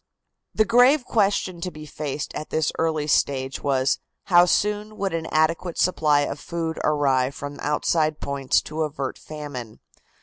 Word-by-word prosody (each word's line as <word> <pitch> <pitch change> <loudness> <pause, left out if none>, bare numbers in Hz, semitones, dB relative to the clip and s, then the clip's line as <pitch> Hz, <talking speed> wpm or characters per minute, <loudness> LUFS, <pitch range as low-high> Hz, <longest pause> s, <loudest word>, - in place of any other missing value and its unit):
The 215 - +4
grave 245 +5 +5
question 195 -5 0
to 180 - -2
be 155 -3 -10
faced 150 -1 -5
at 155 - -6
this 155 -1 0
early 160 -2 0
stage 135 -2 0
was: 135 -1 +1 0.2
How 175 -2 +6
soon 210 +3 0
would 195 -2 -2
an 165 -1 -2
adequate 165 +2 0
supply 155 -5 +3
of 145 - -3
food 165 -1 -4
arrive 140 -3 +2
from 145 0 -7
outside 155 +1 0
points 140 -2 0
to 155 +1 -5
avert 145 -3 -3
famine? 145 -7 -8
155 Hz, 155 wpm, -24 LUFS, 145-175 Hz, 0.2 s, How